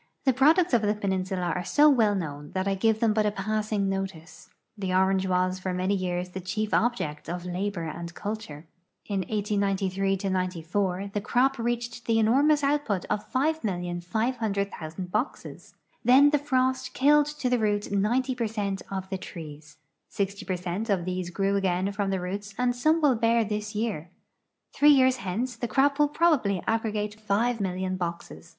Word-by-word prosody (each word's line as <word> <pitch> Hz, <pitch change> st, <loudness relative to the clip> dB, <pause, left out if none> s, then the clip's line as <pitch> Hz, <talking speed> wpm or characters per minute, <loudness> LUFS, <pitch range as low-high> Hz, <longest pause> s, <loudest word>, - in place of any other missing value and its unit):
J'he 265 Hz, -3 st, +3 dB
products 315 Hz, +5 st, +4 dB
of 235 Hz, -, +4 dB
the 210 Hz, 0 st, +1 dB
peninsula 190 Hz, -3 st, -1 dB
are 180 Hz, -, -2 dB
so 290 Hz, -, +4 dB
well 225 Hz, -8 st, +4 dB
known 150 Hz, -5 st, -5 dB
that 185 Hz, +1 st, -1 dB
I 195 Hz, -, +2 dB
give 220 Hz, +3 st, +1 dB
them 225 Hz, -2 st, +3 dB
but 215 Hz, -1 st, +2 dB
a -, -, +4 dB
passing 210 Hz, 0 st, -1 dB
notice. 175 Hz, -4 st, -5 dB, 0.3 s
The 195 Hz, -3 st, -3 dB
orange 190 Hz, 0 st, +2 dB
was 185 Hz, 0 st, +1 dB
for 185 Hz, 0 st, -3 dB
many 185 Hz, +2 st, 0 dB
years 180 Hz, -2 st, -2 dB
the 185 Hz, +1 st, -6 dB
chief 210 Hz, +4 st, -3 dB
object 160 Hz, -11 st, 0 dB
of 175 Hz, +1 st, -4 dB
labor 180 Hz, 0 st, -3 dB
and 170 Hz, +2 st, -6 dB
culture. 205 Hz, -8 st, -6 dB, 0.4 s
In 200 Hz, -2 st, -2 dB
1893 195 Hz, -2 st, 0 dB
'94 185 Hz, +1 st, -1 dB
the 205 Hz, -, -1 dB
cro]i 260 Hz, +6 st, +2 dB
reached 240 Hz, 0 st, -3 dB
the 225 Hz, -1 st, +3 dB
enormous 280 Hz, +7 st, +3 dB
outi>ut 275 Hz, -10 st, 0 dB
of 210 Hz, -, -2 dB
5,500,000 200 Hz, -, -2 dB
boxes. 215 Hz, +8 st, -4 dB, 0.3 s
Then 275 Hz, +4 st, +6 dB
frost 260 Hz, -3 st, 0 dB
killed 295 Hz, +2 st, +4 dB
to 265 Hz, -, -1 dB
the 250 Hz, -1 st, +2 dB
roots 205 Hz, -2 st, 0 dB
90 240 Hz, +6 st, +1 dB
per 240 Hz, -2 st, -1 dB
cent 200 Hz, -3 st, -3 dB
of 190 Hz, -1 st, -4 dB
the 190 Hz, -, -2 dB
trees. 155 Hz, -4 st, -10 dB, 0.3 s
Sixty 200 Hz, 0 st, -3 dB
per 185 Hz, -, -2 dB
cent 180 Hz, +5 st, -4 dB
of 185 Hz, -4 st, +1 dB
these 185 Hz, -1 st, -3 dB
grew 195 Hz, +2 st, 0 dB
again 190 Hz, 0 st, 0 dB
from 200 Hz, -1 st, -2 dB
the 190 Hz, -1 st, 0 dB
roots 200 Hz, +3 st, -5 dB
and 245 Hz, -1 st, +1 dB
some 310 Hz, +6 st, +2 dB
will 285 Hz, -3 st, +5 dB
bear 230 Hz, 0 st, +2 dB
this 210 Hz, +1 st, -4 dB
year. 205 Hz, -7 st, -2 dB, 0.6 s
Three 295 Hz, -, +5 dB
years 260 Hz, -2 st, +5 dB
hence 235 Hz, +5 st, -3 dB
the 240 Hz, -, -3 dB
crop 280 Hz, +5 st, +2 dB
will 295 Hz, -, +5 dB
probably 290 Hz, -, +2 dB
aggregate 215 Hz, -1 st, -2 dB
5,000,000 195 Hz, -4 st, 0 dB
boxes. 170 Hz, -1 st, -6 dB
200 Hz, 170 wpm, -27 LUFS, 185-235 Hz, 0.6 s, Then